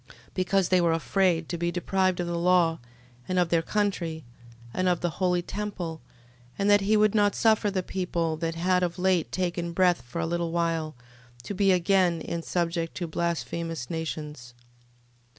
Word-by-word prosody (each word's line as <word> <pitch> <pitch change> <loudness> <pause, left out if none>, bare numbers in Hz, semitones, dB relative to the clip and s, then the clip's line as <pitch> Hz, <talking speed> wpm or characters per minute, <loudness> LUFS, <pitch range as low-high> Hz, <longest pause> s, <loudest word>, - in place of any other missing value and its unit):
Because 185 0 +1
they 185 -1 +4
were 170 -1 +3
afraid 170 0 +1
to 170 - -3
be 170 0 0
deprived 185 +1 0
of 175 - 0
the 170 0 -2
law, 175 -2 +3 0.5
and 185 - -1
of 175 -2 +2
their 165 -1 +3
country, 170 -5 -2 0.5
and 185 0 +1
of 175 -2 0
the 175 - 0
holy 180 -1 +2
temple: 180 -6 -5 0.6
and 200 +1 +2
that 205 0 +6
he 210 +2 +3
would 210 -1 +4
not 205 -2 +3
suffer 220 -2 +3
the 190 -2 -2
people, 170 -4 -2
that 165 0 -2
had 180 +2 +2
of 175 0 -1
late 185 -3 +1
taken 175 -2 -2
breath 180 -4 +3
for 125 +7 -7
a 165 - 0
little 170 0 -2
while, 165 -3 -1 0.5
to 205 - -5
be 195 0 +3
again 180 -1 +3
in 170 +1 -4
subjection 170 -1 -2
to 175 - -3
blasphemous 165 -2 -3
nations. 150 -6 -5
175 Hz, 175 wpm, -27 LUFS, 165-185 Hz, 0.6 s, that